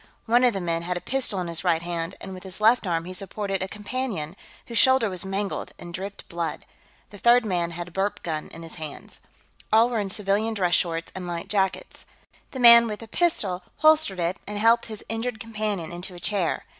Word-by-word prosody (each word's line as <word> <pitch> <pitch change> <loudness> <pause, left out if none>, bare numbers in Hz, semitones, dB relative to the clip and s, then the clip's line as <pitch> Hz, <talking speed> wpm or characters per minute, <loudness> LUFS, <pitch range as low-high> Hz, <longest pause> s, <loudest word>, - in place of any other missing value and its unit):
One 240 +2 +4
of 245 -2 +4
the 195 - -2
men 170 -1 -1
had 180 +1 -3
a - - -3
pistol 250 -3 0
in 175 - -4
his 170 -1 -3
right 165 0 +2
hand, 170 +1 -3
and 190 - -8
with 185 - -9
his 190 +1 -4
left 220 0 +4
arm 165 -1 -1
he 185 - -7
supported 195 +1 -3
a 190 - -1
companion, 205 -6 -4 0.3
whose 235 -2 0
shoulder 260 -5 +4
was 180 -1 -2
mangled 195 +1 -3
and 175 0 -10
dripped 195 +2 -7
blood. 170 -2 -4 0.5
The 205 - -11
third 240 +1 +5
man 175 -4 0
had 175 +1 -6
a - - -19
burp 200 +3 -2
gun 155 -2 -3
in 165 - -11
his 165 +1 -7
hands. 155 -3 -8 0.5
All 230 +3 +5
were 230 - 0
in 200 -2 -2
civilian 210 +3 0
dress 180 -4 +1
shorts 165 -2 0
and 185 -1 -6
light 170 -1 -5
jackets. 195 -2 -1 0.4
The 260 - -7
man 235 -1 +9
with 210 0 -5
the 225 - -9
pistol 215 - 0 0.2
holstered 310 -11 +4
it 170 +2 -1
and 210 0 -4
helped 230 +2 +4
his 215 -2 -9
injured 225 0 -3
companion 210 -6 -3
into 180 +1 -5
a - - -9
chair. 190 -1 -1
195 Hz, 220 wpm, -25 LUFS, 175-225 Hz, 0.5 s, man